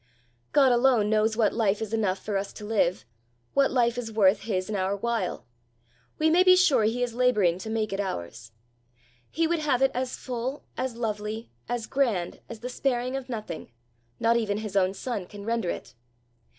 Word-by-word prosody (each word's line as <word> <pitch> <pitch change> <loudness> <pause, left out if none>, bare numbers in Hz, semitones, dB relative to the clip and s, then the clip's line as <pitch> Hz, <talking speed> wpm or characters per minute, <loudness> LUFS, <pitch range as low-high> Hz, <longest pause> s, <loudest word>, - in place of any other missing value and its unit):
God 275 -3 +5
alone 240 -4 +3
knows 220 0 +2
what 220 -3 +3
life 210 -3 +1
is 220 -1 -5
enough 205 -4 +1
for 205 +1 -4
us 195 0 -2
to 210 - -9
live 205 - +1 0.5
what 275 -1 +4
life 245 -1 +2
is 225 -2 -5
worth 205 -2 +4
his 185 -4 -2
and 215 - -3
our 190 +1 0
while; 230 -4 -2 0.7
we 310 - +2
may 335 +3 +5
be 370 0 +7
sure 290 -12 +4
he 240 +3 0
is 245 -2 -2
labouring 215 -8 +2
to 220 - -6
make 220 -2 -1
it 195 - -3
ours. 115 - -5 0.8
He 330 +2 0
would 335 0 +1
have 275 -4 +1
it 270 - +4
as 255 0 -2
full, 255 +2 -4
as 255 -2 -3
lovely, 215 - -4 0.2
as 240 -2 -2
grand, 225 -11 0
as 230 -2 -8
the 245 - -4
sparing 255 0 -1
of 270 -1 -5
nothing, 215 -8 -6 0.5
not 230 +1 +3
even 210 -3 0
his 210 -2 -5
own 190 0 +2
son, 210 -5 -4
can 205 +1 -10
render 230 -5 -1
it. 125 - -5
225 Hz, 190 wpm, -27 LUFS, 205-250 Hz, 0.8 s, be